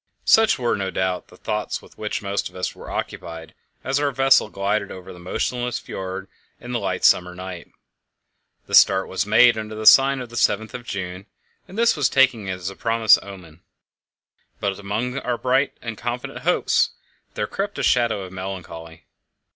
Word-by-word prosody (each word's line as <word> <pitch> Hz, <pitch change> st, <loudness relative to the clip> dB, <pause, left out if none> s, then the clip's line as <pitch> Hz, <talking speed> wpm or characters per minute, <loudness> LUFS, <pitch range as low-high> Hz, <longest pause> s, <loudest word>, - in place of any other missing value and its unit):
Such 220 Hz, -1 st, +5 dB
were, 120 Hz, -3 st, 0 dB
no 95 Hz, -2 st, -2 dB
doubt, 95 Hz, -1 st, -2 dB
the -, -, -17 dB
thoughts 105 Hz, 0 st, -3 dB
with -, -, -18 dB
which 105 Hz, -1 st, -4 dB
most 100 Hz, 0 st, -2 dB
of -, -, -21 dB
us 90 Hz, -, -3 dB
were -, -, -11 dB
occupied 80 Hz, -1 st, -6 dB, 0.3 s
as 135 Hz, +2 st, 0 dB
our 145 Hz, -1 st, +1 dB
vessel 135 Hz, -4 st, +4 dB
glided 100 Hz, 0 st, -1 dB
over 95 Hz, -1 st, -9 dB
the 90 Hz, -, -13 dB
motionless 120 Hz, +7 st, -2 dB
fjord 95 Hz, 0 st, -6 dB, 0.3 s
in 120 Hz, -, -8 dB
the 120 Hz, -, -1 dB
light -, -, -2 dB
summer 90 Hz, 0 st, +4 dB
night. 90 Hz, -2 st, -8 dB, 0.9 s
The -, -, -12 dB
start 95 Hz, 0 st, +6 dB
was 95 Hz, -, -2 dB
made 110 Hz, +2 st, +5 dB
under 110 Hz, 0 st, -6 dB
the 110 Hz, 0 st, -5 dB
sign 135 Hz, +3 st, +7 dB
of 125 Hz, -2 st, -7 dB
the 120 Hz, -, -8 dB
Seventh 110 Hz, 0 st, +1 dB
of 120 Hz, -1 st, -7 dB
June, 95 Hz, 0 st, -5 dB, 0.4 s
and 190 Hz, -, -11 dB
this 235 Hz, 0 st, +4 dB
was 140 Hz, -5 st, +2 dB
taken 130 Hz, -7 st, +3 dB
as 90 Hz, -1 st, -4 dB
a -, -, -12 dB
promising 115 Hz, 0 st, +4 dB
omen; 90 Hz, -5 st, -12 dB, 1.0 s
but 100 Hz, -1 st, -2 dB
among 110 Hz, +6 st, -3 dB
our 125 Hz, -2 st, -2 dB
bright 130 Hz, +3 st, +1 dB
and 115 Hz, -2 st, -5 dB
confident 125 Hz, +4 st, -5 dB
hopes 170 Hz, +7 st, +2 dB, 0.5 s
there -, -, -1 dB
crept 200 Hz, +1 st, -4 dB
a -, -, -2 dB
shadow 115 Hz, -5 st, +2 dB
of 95 Hz, 0 st, -10 dB
melancholy. 90 Hz, -3 st, -8 dB
105 Hz, 180 wpm, -22 LUFS, 95-125 Hz, 1.0 s, sign